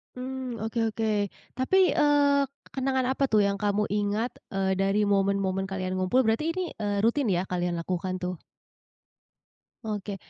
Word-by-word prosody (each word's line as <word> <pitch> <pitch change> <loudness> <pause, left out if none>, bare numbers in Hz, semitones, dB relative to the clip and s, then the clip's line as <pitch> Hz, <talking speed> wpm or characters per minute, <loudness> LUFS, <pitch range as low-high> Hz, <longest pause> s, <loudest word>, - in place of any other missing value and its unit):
Mmm, 255 -2 -5
oke 225 +1 -2
oke. 220 -1 -1 0.5
Tapi, 260 +9 +3
eee, 290 -1 +4
k 265 - -21 0.2
kenangan 265 -1 0
apa 270 +1 +1
tuh 215 -5 +3
yang 200 0 +1
kamu 205 0 0
ingat, 210 +3 0 0.2
eee, 190 -1 0
dari 195 +2 +2
momen-momen 195 -1 +1
kalian 185 -1 -3
ngumpul 185 +8 +3
berarti 255 +9 +1
ini, 370 -2 -2
eee, 205 -2 -1
rutin 235 +6 +2
ya 175 - +1
kalian 175 -1 -1
lakukan 185 +1 -3
tuh? 180 0 -2 1.5
Oke. 205 -2 -4
210 Hz, 150 wpm, -27 LUFS, 195-260 Hz, 1.5 s, eee